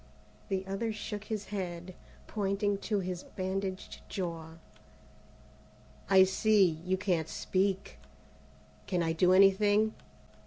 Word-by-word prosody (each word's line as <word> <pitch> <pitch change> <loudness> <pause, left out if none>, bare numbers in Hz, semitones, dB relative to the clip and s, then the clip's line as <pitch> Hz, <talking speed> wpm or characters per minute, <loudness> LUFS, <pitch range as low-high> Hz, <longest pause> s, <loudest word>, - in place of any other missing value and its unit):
The 190 -1 -1
other 195 +4 -2
shook 210 -1 -6
his 215 -2 -4
head, 180 -2 -4 0.3
pointing 200 -1 -1
to 205 -3 +1
his 180 -1 -4
bandaged 190 0 -4
jaw. 165 -4 -4 1.6
"I 190 -1 +8
see, 190 -3 +3
you 185 +1 0
can't 180 -5 0
speak. 190 0 -1 0.9
Can 180 -3 0
I 165 0 0
do 180 +2 +3
anything?" 205 +3 +5
190 Hz, 110 wpm, -31 LUFS, 180-205 Hz, 1.6 s, I